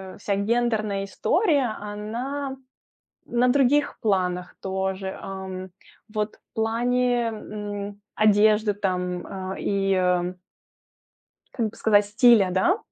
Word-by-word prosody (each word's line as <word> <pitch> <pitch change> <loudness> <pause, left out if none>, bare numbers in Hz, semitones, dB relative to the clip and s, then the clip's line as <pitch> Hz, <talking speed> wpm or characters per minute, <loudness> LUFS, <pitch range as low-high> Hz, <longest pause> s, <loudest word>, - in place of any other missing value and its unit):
а, - - -14
вся 205 0 -1
гендерная 215 -2 0
история, 285 - +1
она 240 +7 -4 0.7
на 245 +1 +2
других 280 +2 +3
планах 180 -4 0
тоже, 190 0 -3
ам. 190 -1 -6 0.4
Вот 215 0 -3
в - - -43
плане, 245 +2 +1
м, 205 -2 -6
одежды 215 0 +4
там, 180 -2 -2
а, 190 -1 -5
и, 195 -1 +1
а, 180 -1 +2
м. 180 +1 -4 1.2
Как 225 -4 -1
бы - - -17
сказать, 205 -2 +4
стиля, 215 -1 +5
да? 270 - +2
210 Hz, 115 wpm, -25 LUFS, 190-235 Hz, 1.2 s, стиля